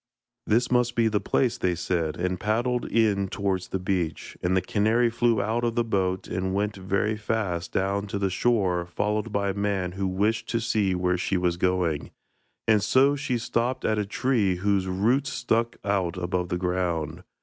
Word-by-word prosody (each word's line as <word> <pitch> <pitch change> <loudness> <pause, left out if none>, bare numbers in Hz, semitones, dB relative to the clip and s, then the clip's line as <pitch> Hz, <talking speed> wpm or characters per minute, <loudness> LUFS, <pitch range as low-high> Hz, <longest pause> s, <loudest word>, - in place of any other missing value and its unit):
'This 120 +4 +2
must 125 -1 +2
be 115 -1 +3
the 105 -2 +1
place,' 125 -3 +1
they 90 -1 +1
said, 85 -3 -1
and 90 +1 -1
paddled 120 +4 0
in 105 -4 +2
towards 95 -1 -2
the - - -2
beach, 90 -3 -2
and 90 +1 +1
the - - +5
canary 110 +5 +2
flew 115 -1 +2
out 110 +4 0
of 115 -1 0
the 120 - +2
boat 95 -4 -1
and 95 0 -2
went 105 +1 0
very 100 +3 0
fast 105 -6 -2
down 100 +2 -1
to 100 - -3
the 100 -1 0
shore 95 -5 +1
followed 105 +4 -1
by 100 -1 0
a - - -5
man 100 -3 -1
who 95 +1 -2
wished 105 +5 0
to 115 - 0
see 110 -5 +1
where 90 0 0
she 95 +1 0
was 90 -1 +1
going, 90 -4 0 0.6
and 110 -2 +4
she 135 +3 +2
stopped 120 +2 -1
at 110 -1 +1
a - - +1
tree 105 -4 +1
whose 95 +1 0
roots 120 +10 +1
stuck 115 -1 0
out 95 -4 0
above 90 0 -2
the 90 - -1
ground. 90 -3 -2
100 Hz, 185 wpm, -26 LUFS, 90-115 Hz, 0.6 s, the